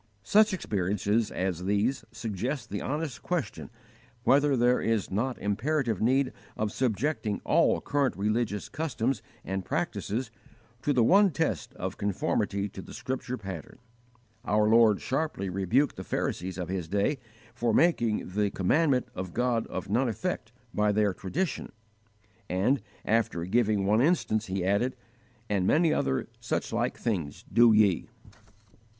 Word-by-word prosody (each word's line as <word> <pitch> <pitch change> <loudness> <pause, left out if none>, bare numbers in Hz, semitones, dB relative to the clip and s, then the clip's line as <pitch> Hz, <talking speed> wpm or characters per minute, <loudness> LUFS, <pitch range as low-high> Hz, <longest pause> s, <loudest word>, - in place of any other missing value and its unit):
Such 215 - +5
experiences 105 - 0
as 90 -1 -2
these 105 +7 +1
suggest 115 +2 -4
the 100 - -3
honest 150 -1 -3
question 165 -14 -3 0.5
whether 140 0 +4
there 125 +1 +3
is 115 -3 0
not 120 +6 -1
imperative 115 +2 0
need 130 +4 +2 0.2
of 105 -1 -1
subjecting 120 -2 -1
all - - +3
current 140 -9 0
religious 105 +1 -1
customs 135 -6 -2 0.2
and 95 +1 -2
practices 115 +6 -2 0.5
to 145 - +1
the 125 -4 +4
one 200 - +6
test 150 - -2
of - - -5
conformity 100 0 0
to 95 - -8
the - - -11
scripture 125 +2 -4
pattern. 95 - -8 0.7
Our 105 0 +2
Lord 110 -2 +5
sharply 130 -9 -2
rebuked 110 +10 +1
the - - -5
Pharisees 95 +2 -2
of 90 -2 -3
His 90 -3 -3
day 100 - 0 0.3
for 120 -1 0
making 120 - +2
"the 100 +2 0
commandment 130 - +2
of 90 -1 -6
God 120 -2 +1
of 95 - -5
none 120 +5 +1
effect 115 -4 -3 0.2
by 105 0 +2
their 105 -1 +2
tradition," 145 - -3 0.8
and, 100 +9 +2 0.2
after 105 -6 +1
giving 105 0 +2
one 105 +3 +3
instance, 130 -8 +1
He 95 -1 -2
added, 100 +7 +1 0.5
"and 95 -3 +1
many 160 0 +4
other 65 - 0
such - - -2
like - - 0
things 90 -11 -3
do 120 -1 +7
ye." 105 -2 +3
110 Hz, 140 wpm, -28 LUFS, 100-130 Hz, 0.8 s, do